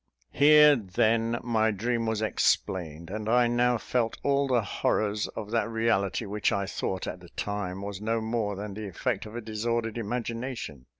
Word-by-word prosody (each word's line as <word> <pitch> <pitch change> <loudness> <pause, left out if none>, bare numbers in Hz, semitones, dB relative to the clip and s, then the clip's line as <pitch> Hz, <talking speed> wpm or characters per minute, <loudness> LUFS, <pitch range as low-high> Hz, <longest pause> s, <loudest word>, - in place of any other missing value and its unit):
Here, 150 0 +7
then, 115 +2 +1
my 110 -2 +2
dream 115 +3 -1
was 110 -1 -1
explained; 85 -5 0
and 110 +1 -4
I 120 +1 +5
now 120 +1 +2
felt 115 0 -1
all 140 0 +2
the 125 -4 +2
horrors 105 +1 0
of 105 -1 -6
that 115 0 +1
reality 110 -2 0
which 105 +1 0
I 100 0 0
thought 95 -1 -3
at 90 - -5
the 90 -1 -14
time 100 -1 -4
was 100 -1 -6
no 115 +1 0
more 110 -2 -1
than 100 +1 -6
the 105 +1 -6
effect 105 +3 -2
of 105 - -10
a 120 - -4
disordered 115 +1 -2
imagination. 115 - -4
110 Hz, 175 wpm, -28 LUFS, 100-120 Hz, -, Here